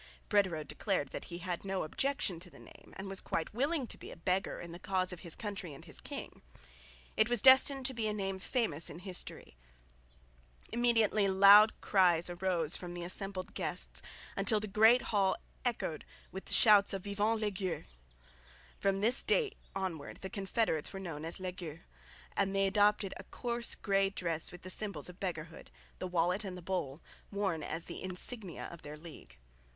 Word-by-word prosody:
Brederode 185 -8 +2
declared 180 -8 -1
that - - -6
he 170 - -6
had 175 0 -4
no 195 -1 -2
objection 195 - -1
to 180 +1 -11
the - - -16
name - - -15
and 195 - -6
was 195 0 -3
quite 165 - -3
willing 280 +4 0
to - - -9
be - - -9
"a - - -9
beggar" 185 +3 -1
in 170 - -8
the 170 - -8
cause 185 -1 0
of 175 - -8
his 170 -2 +1
country 195 -8 -5
and - - -13
his - - -7
king. - - -7 0.7
It 220 - +3
was 240 -3 +1
destined 265 0 +7
to 265 - +2
be 230 -3 -1
a - - +1
name 195 -2 -3
famous 185 - 0
in 150 - -8
history. 180 - -5 1.1
Immediately 225 -4 +3
loud 200 +3 +7
cries 175 -3 +3
arose 175 -3 0
from 175 -1 -6
the 175 - -5
assembled 185 +1 -3
guests, - - -3 0.3
until 215 -3 +3
the 210 - -4
great 220 +4 +5
hall 195 -2 +3 0.3
echoed 225 -10 -2 0.3
with 190 - -7
the - - -1
shouts 205 -3 +6
of 195 -2 -4
Vivent 210 +2 0
les 210 -1 0
Gueux. 185 -2 -3 1.0
From 195 0 +1
this 235 +5 +4
date 440 -4 +1 0.2
onwards 180 -7 -4
the 190 - -6
confederates 195 -5 -1
were 195 - -6
known 165 -5 -6
as 165 +3 +1
"les 185 -1 -3
gueux," 170 -3 -8 0.5
and 195 0 +1
they 195 0 +3
adopted 205 0 +3
a 190 - -9
coarse 235 +1 -2
grey 195 -1 +1
dress 170 -4 -2
with 180 - -12
the 185 - -4
symbols 190 -8 0
of 180 - -12
beggarhood 165 -4 -5 0.3
the 185 - -3
wallet 180 +3 +1
and 185 -2 -5
the - - -8
bowl 165 -5 -3 0.3
worn 195 -5 -1
as 165 +2 -2
the - - -7
insignia 185 +1 -3
of 170 - -10
their 150 +1 -8
league. 155 - -12
190 Hz, 185 wpm, -33 LUFS, 175-210 Hz, 1.1 s, destined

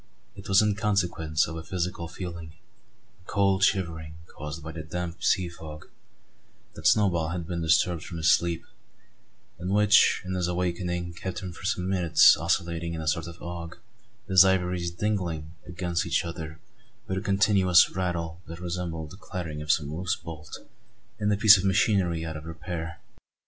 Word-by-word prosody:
It 95 - -10
was 95 +2 +6
in 105 -1 +2
consequence 90 -7 0
of 80 - -6
a - - -5
physical 85 0 -3
feeling 85 -2 -7 0.7
a - - -30
cold 100 -1 +2
shivering 80 -6 0 0.2
caused 75 +1 -7
by 80 - -6
the 80 - -6
damp 85 +2 -5
sea 90 -2 +2
fog 80 -3 -10 0.8
that - - -1
Snowball 90 -7 +3
had 85 0 -4
been 85 -1 -3
disturbed 80 +1 +2
from 85 - -7
his 80 -1 +4
sleep; 85 -1 +1 1.0
and 90 +2 -4
which, 105 0 +4
on 95 - -3
his 90 -1 0
awaking, 90 -1 -2
kept 95 +2 -5
him 90 -2 -6
for 95 - -10
some 95 -2 -1
minutes 90 -4 +6
oscillating 85 0 -1
in 80 - -4
a 80 - -6
sort 80 +1 0
of 85 0 -11
ague, 85 -1 -6 0.5
his 95 0 +7
ivories 90 -2 +1
"dingling" 85 -5 -2 0.2
against 85 0 -2
each 85 - +1
other 80 -2 -7 0.5
with 95 0 -1
a - - -7
continuous 95 -3 +4
rattle 85 -2 -3
that 85 +1 -8
resembled 85 -3 -4
the 90 - -11
clattering 85 -7 -6
of 75 0 +1
some 75 -1 0
loose 90 +1 -1
bolt 80 -2 -9 0.6
in 105 0 +1
a 105 - +2
piece 110 -1 +8
of - - -3
machinery 95 -4 +2
out 80 -1 -5
of 75 +1 -8
repair. 80 0 -6
85 Hz, 170 wpm, -27 LUFS, 80-95 Hz, 1.0 s, piece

